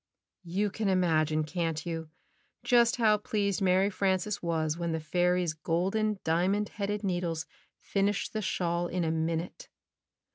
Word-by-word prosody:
You 200 +4 0
can 210 -1 -1
imagine, 155 -4 +2
can't 165 0 -2
you, 165 -2 -4 0.5
just 240 -1 +4
how 215 -3 +3
pleased 200 -1 -1
Mary 190 +1 +3
Frances 195 +1 0
was 160 -2 0
when 170 -1 -2
the 160 - -1
fairy's 175 +1 +1
golden 195 +7 0
diamond 185 +6 +1
headed 205 +1 -3
needles 175 -4 -1 0.3
finished 200 0 -1
the 215 - -1
shawl 175 -3 -1
in 180 0 -1
a 160 - 0
minute? 165 - -3
180 Hz, 140 wpm, -29 LUFS, 165-205 Hz, 0.5 s, just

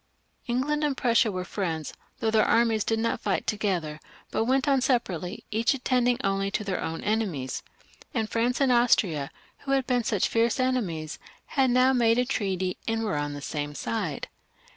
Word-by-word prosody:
England 280 +5 0
and 285 -3 0
Prussia 235 -3 +3
were 185 -1 -4
friends, 165 -7 -3 0.3
though 220 -1 +1
their 220 -1 +4
armies 230 -2 +3
did 225 - 0
not 230 +1 0
fight - - -1
together, 180 -8 -1 0.3
but 225 - 0
went 265 +3 +2
on 275 -2 +3
separately, 205 - -1
each 225 +5 +2
attending 250 -2 +1
only 195 0 0
to 205 - -2
their 195 -2 -2
own 165 0 -4
enemies, 190 -12 -1 0.5
and 225 -3 -1
France 235 +3 0
and 275 -2 +3
Austria, 195 - +3 0.3
who 275 - -2
had 270 -2 +2
been 250 -2 +1
such 210 -3 +1
fierce 230 +2 +1
enemies, 195 -13 -1 0.3
had 265 -2 +2
now 255 +2 +4
made 230 -2 +3
a 250 - +3
treaty 190 -7 -1
and 225 0 0
were 210 -6 -1
on 145 0 -2
the 145 -1 -7
same 145 -1 -4
side. 180 -9 -3
225 Hz, 180 wpm, -27 LUFS, 185-250 Hz, 0.5 s, their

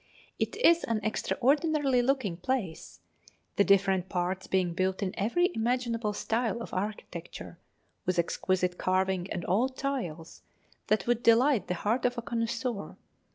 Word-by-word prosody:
It - - -1
is 340 -7 +4
an 230 -2 0
extraordinary 275 +4 +2
looking 245 -8 0
place, 175 - -4 0.5
the 200 - +4
different 195 -2 +3
parts 185 +1 -2
being 185 -2 +1
built 185 +3 -1
in 185 - -2
every 350 - +1
imaginable 230 -2 -1
style 230 +3 -1
of 230 - -8
architecture, 180 -4 -5 0.5
with 185 -1 +1
exquisite 180 +1 0
carving 185 0 0
and 175 - -3
old 255 +7 +1
tiles 175 - -4 0.5
that 215 -2 +1
would 240 -1 +1
delight 240 +1 +4
the 180 - -1
heart 220 +8 0
of 245 0 +1
a 235 - -3
connoisseur. 230 -1 -3
215 Hz, 140 wpm, -29 LUFS, 185-245 Hz, 0.5 s, is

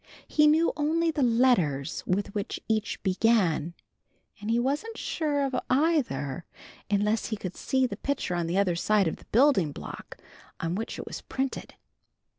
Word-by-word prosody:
He 300 -1 +4
knew 315 +2 +4
only 325 +2 +1
the 300 -2 -2
letters 230 - +2
with 200 +2 -1
which 205 -1 -3
each 220 -1 -1
began, 185 -5 +2 0.6
and 210 +1 -5
he 230 - +3
wasn't 290 - -1
sure 295 -3 -1
of 270 -1 -2
either 250 - +1 0.5
unless 210 +2 +1
he 215 - -3
could 185 -2 -6
see 260 -1 +1
the 250 - -4
picture 280 -9 -2
on 175 -1 -1
the 175 +3 -1
other 190 -3 +2
side 200 +2 +2
of 160 - -2
the - - -18
building 235 - +3
block - - -9 0.4
on 165 +1 -2
which 220 +5 -4
it - - -6
was - - -7
printed. 265 0 -4
220 Hz, 165 wpm, -27 LUFS, 180-280 Hz, 0.6 s, He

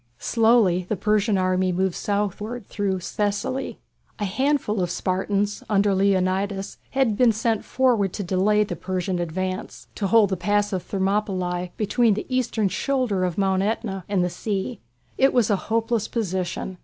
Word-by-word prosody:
Slowly 220 - +3
the 215 - +1
Persian 210 0 +1
army 185 0 +1
moved 185 0 0
southward 210 +4 -2
through 195 -3 -2
Thessaly. 205 +8 -2 0.4
A 205 - -2
handful 245 -1 0
of 175 - 0
Spartans, 200 +3 -1
under 200 -1 +3
Leonidas, 195 0 0
had 265 -6 +1
been 240 +1 +5
sent 220 0 0
forward 240 -7 +2
to 205 - -3
delay 195 +4 +2
the 185 -4 -4
Persian 185 +1 -2
advance. 185 +3 -4
They 200 - -1
held 210 0 +4
the 190 - 0
Pass 205 +3 +1
of 185 - -2
Thermopylæ, 190 -3 -1
between 220 +1 +2
the 210 - -4
eastern 225 -4 +1
shoulder 250 -6 0
of 180 -2 -1
Mount 190 -1 +2
Æta 200 -2 -2
and 195 -3 +2
the 180 - -1
sea. 195 +2 -3 0.4
It 270 +1 +4
was 235 -4 +3
a - - +4
hopeless 225 -1 0
position. 185 -3 -3
200 Hz, 155 wpm, -24 LUFS, 185-220 Hz, 0.4 s, been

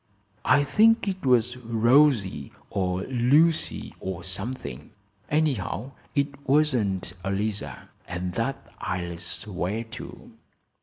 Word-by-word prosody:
"I 145 - +5
think 220 - +4
it 190 -1 -2
was 125 -1 +3
Rosie 115 - +3 0.2
or 95 -1 0
Lucy, 140 +7 +2
or 90 -2 -5
something. 95 - -6 0.4
Anyhow, 135 - 0 0.2
it 140 -1 -1
wasn't 125 -11 +2
Eliza, 100 +2 -3 0.2
and 90 0 -3
that 115 +6 -3
I'll 85 -2 -3
swear 95 +4 -3
to. 115 -1 -10
115 Hz, 100 wpm, -26 LUFS, 95-140 Hz, 0.4 s, I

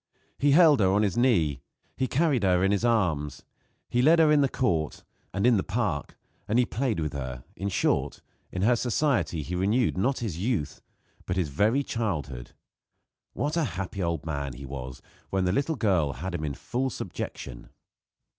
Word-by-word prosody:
He 145 - +3
held 155 -3 +6
her 95 - +4
on 100 +2 +3
his 100 -1 0
knee; 85 - +2 0.3
he 130 - 0
carried 145 -2 +2
her 90 -2 +3
in 95 - +3
his 100 +1 0
arms; 85 - 0 0.4
he 120 - +1
led 160 +6 +6
her 160 -2 +5
in 150 -1 +5
the 140 - +2
court 85 - -1 0.3
and 100 +4 -1
in 125 -3 +5
the 95 - 0
park, 105 -12 -2 0.3
and 110 - +1
he 125 - +4
played 120 -4 -1
with 75 -2 -2
her; 65 -3 -5
in 100 +3 -3
short, 95 - 0 0.3
in 90 - -2
her 120 +3 +4
society 115 - 0
he 85 - -6
renewed, 100 +3 +1
not 130 +6 +1
his 100 -9 -4
youth, 95 - -2 0.5
but 90 - -1
his 90 -5 0
very 110 - +2
childhood. 75 - -3 0.8
What 150 +3 -2
a 170 - +2
happy 95 +1 -4
old 85 -3 -2
man 70 -4 -3
he 65 +3 -9
was 65 -2 -7 0.3
when 95 -1 0
the 90 - +2
little 145 +6 0
child 90 - +1
had 95 +1 -5
him 80 -3 -3
in 70 -2 -3
full 130 - -2
subjection. - - -6
100 Hz, 185 wpm, -27 LUFS, 80-125 Hz, 0.8 s, held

